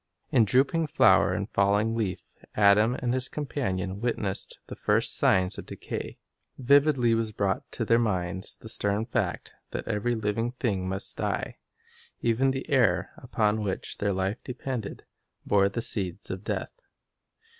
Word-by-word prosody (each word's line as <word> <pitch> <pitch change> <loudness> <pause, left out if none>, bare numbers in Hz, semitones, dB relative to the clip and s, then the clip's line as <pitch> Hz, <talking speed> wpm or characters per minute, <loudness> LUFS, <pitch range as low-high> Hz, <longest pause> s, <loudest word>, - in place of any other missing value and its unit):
In 115 - +5
drooping 140 - +2
flower - - +4
and - - -2
falling 105 +3 +2
leaf 105 -6 -2 0.3
Adam 105 +3 +5
and 120 -1 -1
his 130 0 0
companion 100 -10 -3
witnessed 105 -5 -2
the - - -8
first - - +2
signs 95 0 +2
of - - -9
decay. - - -6 0.4
Vividly 135 -2 +4
was 115 -1 0
brought 100 -2 -2
to - - -2
their 115 - +4
minds 95 -4 -1
the - - -13
stern 105 -1 0
fact 115 -6 -2 0.2
that - - -5
every 120 +4 0
living 110 +2 -1
thing 100 -7 -2
must 95 +1 -3
die. - - -3 0.6
Even 120 +3 +2
the 135 0 -3
air, 135 -6 +2
upon 110 -4 0
which 100 -3 -4
their 100 0 +1
life 95 +4 -2
depended, 125 -4 -5 0.4
bore 100 -1 +3
the 115 +4 -2
seeds 95 -7 -1
of 95 +1 -6
death. - - -4
110 Hz, 150 wpm, -27 LUFS, 100-125 Hz, 0.6 s, In